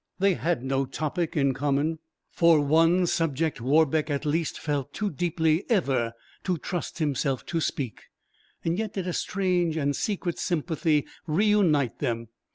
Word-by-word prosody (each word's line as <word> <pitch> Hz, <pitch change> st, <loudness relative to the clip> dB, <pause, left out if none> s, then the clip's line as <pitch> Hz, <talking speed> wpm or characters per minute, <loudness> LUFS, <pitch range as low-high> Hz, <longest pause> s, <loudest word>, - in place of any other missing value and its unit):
They 195 Hz, 0 st, +3 dB
had 170 Hz, -6 st, -1 dB
no 135 Hz, 0 st, 0 dB
topic 155 Hz, +5 st, -2 dB
in 140 Hz, -2 st, +3 dB
common, 145 Hz, +4 st, 0 dB, 0.3 s
for 170 Hz, -2 st, +5 dB
one 165 Hz, +5 st, +4 dB
subject 165 Hz, -4 st, 0 dB
Warbeck 155 Hz, +3 st, +2 dB
at 145 Hz, +1 st, -2 dB
least 155 Hz, +2 st, 0 dB
felt 145 Hz, -2 st, -3 dB
too 210 Hz, -1 st, -2 dB
deeply 160 Hz, +1 st, +1 dB
ever 135 Hz, -, +1 dB, 0.3 s
to 180 Hz, -2 st, 0 dB
trust 175 Hz, +1 st, -4 dB
himself 140 Hz, -4 st, -1 dB
to 165 Hz, -, -2 dB
speak; 130 Hz, -6 st, -3 dB, 0.6 s
yet 195 Hz, +6 st, -1 dB
did 190 Hz, -3 st, -3 dB
a 180 Hz, -, -2 dB
strange 180 Hz, -4 st, 0 dB
and 145 Hz, -2 st, 0 dB
secret 185 Hz, -2 st, -2 dB
sympathy 160 Hz, -3 st, 0 dB, 0.2 s
re 165 Hz, +7 st, +2 dB
unite 170 Hz, -, +2 dB
them. 115 Hz, -4 st, -2 dB
160 Hz, 150 wpm, -26 LUFS, 140-175 Hz, 0.6 s, for